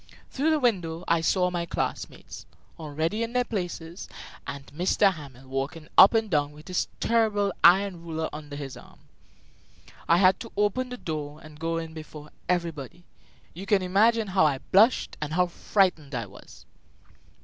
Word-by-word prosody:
Through 285 +4 0
the 310 -1 +3
window 180 - 0
I 170 -1 +3
saw 180 +2 +2
my 170 -1 -3
classmates, - - -5 0.3
already 160 +7 -2
in 230 +1 -3
their 250 0 +2
places, 175 -6 -5 0.4
and 140 +1 -6
M. 190 +3 +3
Hamel 135 -5 -12
walking 140 +4 -4
up 195 +4 +8
and 220 -1 +2
down 150 -5 0
with 150 +5 -14
his 180 - 0
terrible 210 -4 +1
iron 185 0 +5
ruler 160 -1 -3
under 150 -1 -8
his 140 -2 -6
arm. - - -16 1.1
I 170 - +6
had 185 0 +4
to 230 - -9
open 210 +5 +1
the 250 - -6
door 150 -5 -5
and 155 -1 -13
go 165 +1 -1
in 165 -1 -5
before 155 -1 -10 0.2
everybody. 170 -2 -2 0.5
You 190 +4 -9
can 195 -2 +3
imagine 215 +4 +3
how 185 -2 +3
I 140 -3 0
blushed 220 +6 +4
and 150 0 -3
how 180 +2 +3
frightened 175 -5 0
I 115 -2 -2
was. 100 - -15
170 Hz, 165 wpm, -26 LUFS, 150-200 Hz, 1.1 s, up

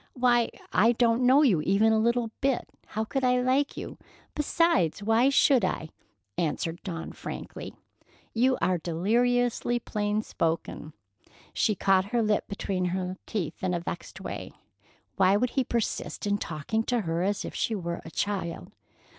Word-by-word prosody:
"Why, 245 -2 +3 0.2
I 230 +2 +5
don't 235 +1 +3
know 275 +4 +6
you 195 - +4
even 205 +6 +3
a 220 - +3
little 235 0 +1
bit. 270 -2 +1 0.2
How 220 - -2
could 265 +4 -2
I 250 0 +3
like 260 +3 +1
you? - - -7 0.3
Besides, 295 - +1
why 225 +5 +4
should 275 -3 +4
I?" 160 -3 -1 0.5
answered 165 +1 -2
Dawn 165 -3 -5
frankly. - - -7 0.6
"You 255 +3 +3
are 185 -1 +2
deliriously 240 +8 +1
plain 210 -2 -1
spoken." 160 -3 -2 0.6
She 215 - +2
caught 190 0 +3
her 230 +3 0
lip 210 -1 +1
between 195 -2 -2
her 185 +1 -2
teeth 175 -7 -4
in 180 -1 +1
a - - -1
vexed 170 0 -6
way. - - -6 0.6
Why 190 +1 +5
would 250 +3 0
he 265 - +1
persist 235 -3 -2
in 205 0 +1
talking 160 +8 -2
to 245 -2 +1
her 165 -2 -1
as 200 +2 0
if - - -6
she 225 - -1
were 170 -3 -4
a - - -9
child? 185 -2 -3
210 Hz, 160 wpm, -27 LUFS, 180-245 Hz, 0.6 s, know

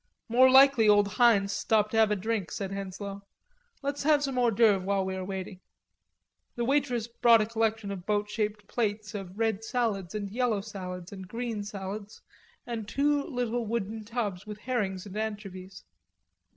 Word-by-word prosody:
"More 255 +2 +6
likely 265 -4 +7
old 205 -1 +5
Heinz 205 -2 +3
stopped 215 -1 +1
to 225 - 0
have 220 -1 +5
a 210 - +2
drink," 210 -1 -2
said 195 -1 -4
Henslowe. 195 0 -6 0.6
"Let's 280 +1 -2
have 295 0 +3
some 270 -2 -2
hors 240 -2 +3
d'oeuvre 205 -4 +4
while 195 0 0
we 190 0 -3
are 190 - -4
waiting." 190 0 -6 1.0
The 240 - -1
waitress 250 -4 +1
brought 235 -1 +5
a 215 - +2
collection 220 -2 -1
of 190 -1 -7
boat 210 -1 +1
shaped 210 -1 -3
plates 215 -2 -2
of 195 -2 -7
red 225 -2 0
salads 220 -6 -1
and 200 -2 -4
yellow 230 -3 0
salads 185 -4 -7
and 190 -2 -8
green 230 0 -4
salads 200 +1 -7 0.4
and 225 -3 -5
two 290 +4 +2
little 245 -6 -2
wooden 220 -1 -3
tubs 210 -4 -3
with 210 -1 -6
herrings 205 -7 -2
and 200 -1 -9
anchovies. 195 -4 -5
215 Hz, 170 wpm, -29 LUFS, 195-235 Hz, 1.0 s, likely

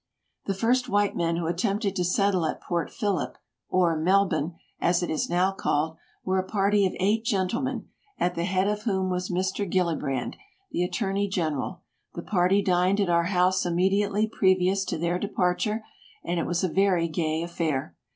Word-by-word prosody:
The 195 - -1
first 245 +5 +1
white 205 -1 +2
men 170 -1 0
who 170 0 -2
attempted 195 +4 -1
to 180 - 0
settle 185 0 +2
at - - -3
Port 170 -1 -2
Phillip, 200 -9 -2 0.3
or 175 -3 +3
Melbourne, 175 -1 +2 0.2
as 175 +1 +2
it - - -2
is 155 - -1
now 180 +2 +2
called, 160 -4 -1 0.3
were 190 0 +1
a - - 0
party 200 +1 +2
of - - -5
eight 210 +4 +2
gentle 200 -1 0
men, 260 - -3 0.3
at 175 0 0
the 170 -1 -2
head 185 +1 +1
of 210 0 -1
whom 190 -4 0
was 180 0 -2
Mr. 185 +2 -1
Gilli 180 -3 +2
brand, 135 -3 -3 0.3
the 175 - 0
attorney 200 +1 -1
general. 170 -1 -2 0.3
The 170 - -5
party 195 +1 +2
dined 185 +2 +2
at 195 -3 +1
our 170 0 +3
house 185 0 +2
immediately 195 +4 +1
previous 190 -2 +2
to - - -2
their 170 +2 0
departure, 205 +3 0 0.4
and 175 0 -1
it 165 - -1
was 175 +1 0
a - - +3
very 185 -1 +2
gay 160 0 -1
affair. 155 - -2
185 Hz, 180 wpm, -26 LUFS, 170-200 Hz, 0.4 s, or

